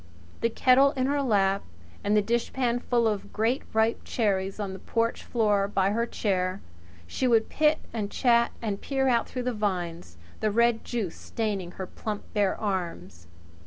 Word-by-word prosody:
The 230 - +1
kettle 265 +4 +4
in 260 -3 0
her 285 +1 +1
lap 200 -6 +2 0.4
and 210 +1 +2
the 210 - +3
dishpan 235 +2 0
full 240 -2 +1
of 210 -2 -2
great 230 +5 +1
ripe 220 +1 +1
cherries 195 -3 -1
on 200 -2 -3
the 190 - -8
porch 230 0 -1
floor 210 -4 +1
by 195 -1 +1
her 230 +2 0
chair, 185 -4 -1 0.5
she 255 - -1
would 225 -2 +3
pit 305 0 +3 0.2
and 210 -3 -2
chat 235 0 +3
and 205 -3 -2
peer 270 -1 0
out 235 -3 +2
through 250 - -4
the 250 0 -1
vines, 175 - -3 0.2
the 215 - +1
red 235 +1 +2
juice 220 -8 -3
staining 200 -6 -3
her 190 - -5
plump 210 +3 -5
bare 205 -3 +1
arms. 135 - -4
215 Hz, 170 wpm, -27 LUFS, 195-235 Hz, 0.5 s, kettle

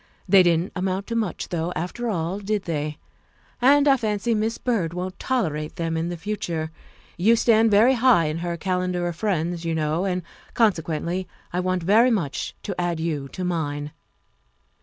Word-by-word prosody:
They 190 0 +7
didn't 175 0 +2
amount 190 +1 -1
to 230 - -4
much 215 -6 -2
though, 170 0 -2
after 205 +9 -3
all, 175 0 -2
did 205 0 -2
they? 150 -2 -3 0.6
And 285 +3 +5
I 275 -1 +6
fancy 220 0 -1
Miss 220 +1 0
Byrd 190 -9 -1
won't 185 +1 -5
tol 260 -2 +1
erate 150 -2 -4
them 165 -2 -2
in 165 +1 -1
the 175 - -4
future; 165 -4 -3 0.5
you 220 +7 +4
stand 225 -1 +4
very 220 +5 +5
high 245 -8 +4
in 155 +2 -2
her 170 0 -3
calendar 180 0 -1
of 175 - -3
friends, 170 -3 -1
you 165 -1 -1
know, 160 +3 0
and, 180 -2 -1 0.3
consequently, 180 -3 0 0.3
I 180 - 0
want 185 -1 -1
very 220 +8 +5
much 175 - -2
to 200 - -3
add 175 -2 -1
you 155 -4 -2
to 185 - -6
mine." 150 -4 -2
180 Hz, 180 wpm, -24 LUFS, 165-215 Hz, 0.6 s, They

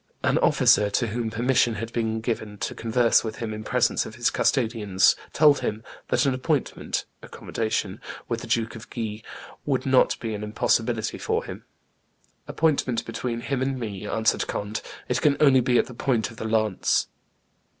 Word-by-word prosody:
An - - +2
officer, 105 - +4
to 120 +4 0
whom 115 +1 -2
permission 120 +1 +2
had 115 +2 -6
been 110 -1 -1
given 110 -3 -3
to - - -3
converse 115 +1 +2
with 110 -1 -4
him 110 0 -4
in 110 0 -6
presence - - +1
of - - -9
his - - +1
custodians, 110 -6 +2 0.2
told 150 -2 +5
him 110 +1 -3 0.2
"that - - +2
an 135 - +2
appointment 135 +2 -2 0.2
(accommodation) 110 -1 -3 0.3
with - - -2
the - - -8
Duke 115 0 0
of 115 +2 -11
Guise 110 -2 -4 0.4
would 135 -3 -1
not 130 -1 +3
be 115 -2 -4
an 105 0 -5
impossibility 110 +1 0
for - - -1
him." - - -9 0.8
"Appointment 140 -7 0
between 115 +1 -4
him 135 +1 -2
and 130 0 -1
me!" 105 -3 -5
answered 110 +1 +1
Conde: 105 +1 -3 0.3
"it 125 0 0
can 145 -2 +3
only 135 -4 +6
be 125 0 +2
at - - +3
the 125 - -10
point 115 -3 0
of 115 - -14
the 110 - -5
lance." 110 -3 +1
115 Hz, 175 wpm, -25 LUFS, 110-125 Hz, 0.8 s, only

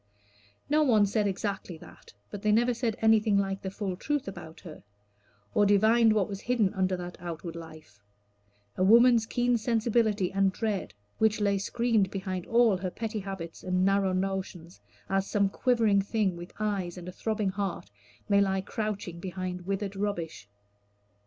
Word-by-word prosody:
No 305 +1 +3
one 225 -8 +4
said 205 +1 0
exactly 195 -3 -3
that; - - -15 0.2
but 205 - -6
they 215 - +2
never 240 +3 +3
said 235 -2 -2
anything 220 -2 +4
like 195 -1 -1
the 190 - -4
full 195 -1 -4
truth 290 +7 -2
about 160 -4 -9
her, 160 -4 -11 0.7
or 205 - +4
divined 220 +3 +5
what 210 -4 +1
was 200 -1 -6
hidden 225 -5 +1
under 185 -2 0
that 180 0 -7
outward 170 -1 -6
life 155 -10 -11 0.8
a 185 - 0
woman's 230 +2 +6
keen 245 0 +1
sensibility 220 -4 +1
and 195 0 +3
dread, 210 - -3 0.2
which 220 -1 +2
lay 200 -1 +1
screened 225 -1 +1
behind 190 -2 -4
all 230 -4 +4
her 185 0 -3
petty 220 +3 -4
habits 190 -4 -7
and 185 0 +1
narrow 195 -1 +2
notions, 185 -2 -4 0.3
as 195 0 0
some 200 -1 +2
quivering 225 -3 +2
thing 200 -2 0
with 175 +1 -9
eyes 195 -5 -2
and 180 0 -8
throbbing 215 -1 -1
heart 190 - -4 0.4
may 200 -1 +4
lie 190 -1 +1
crouching 200 -4 -4
behind 180 0 -5
withered 195 0 -2
rubbish. 175 - -4
200 Hz, 160 wpm, -28 LUFS, 185-220 Hz, 0.8 s, woman's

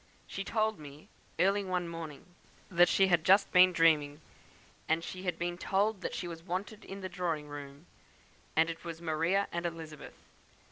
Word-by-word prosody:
She 195 - -5
told 220 0 0
me, 145 0 -12 0.3
early 200 +2 +3
one 180 -2 -2
morning, 165 -4 -7 0.5
that 175 0 +5
she 195 - +4
had 175 -4 +3
just 195 +3 +5
been 185 0 +7
dreaming; 155 -4 +3 0.8
she 185 +2 -7
had 180 -2 -2
been 175 0 -3
told 200 +1 +1
that - - -4
she 180 - -4
was 165 -1 -7
wanted 190 +5 -5
in 195 +1 -8
the 190 - -3
drawing 175 -5 -3
room, 145 +1 -9 0.7
and 160 +1 +4
it 165 - -10
was 165 -1 -6
Maria 170 +4 +1
and 170 0 -3
Elizabeth. 160 -3 -7
175 Hz, 170 wpm, -31 LUFS, 160-190 Hz, 0.8 s, been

